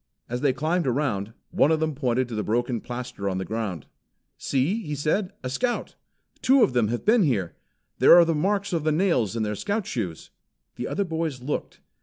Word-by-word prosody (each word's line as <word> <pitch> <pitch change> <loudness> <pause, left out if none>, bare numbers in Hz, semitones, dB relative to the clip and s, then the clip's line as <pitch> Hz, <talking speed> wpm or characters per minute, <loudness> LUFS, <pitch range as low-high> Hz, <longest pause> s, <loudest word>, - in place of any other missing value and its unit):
As 125 +1 -3
they 145 - +3
climbed 160 +5 0
around, 120 -6 -1 0.2
one 150 - +3
of 160 - +2
them 160 -1 0
pointed 130 -2 0
to - - -6
the 105 - -1
broken 120 +2 -1
plaster 120 -5 -5
on 95 - -2
the 95 - -3
ground. 105 -9 -4 0.5
"See!" 150 - 0
he 150 -7 -4
said. 160 +7 0
"A 130 - -3
Scout! 240 - -1 0.5
Two 265 -1 +5
of 130 - +2
them 120 -3 +2
have 120 +2 -3
been 225 +2 +5
here. 110 - +1 0.5
There - - +8
are 175 -1 +8
the 165 - +1
marks 195 +5 0
of 165 -3 0
the 155 - +2
nails 155 - +1
in 115 - 0
their 105 0 -1
Scout 205 - -2
shoes." 95 -10 -4 0.4
The - - -4
other 200 - -1
boys 160 -7 -3
looked. 145 - -4
135 Hz, 205 wpm, -25 LUFS, 115-170 Hz, 0.5 s, There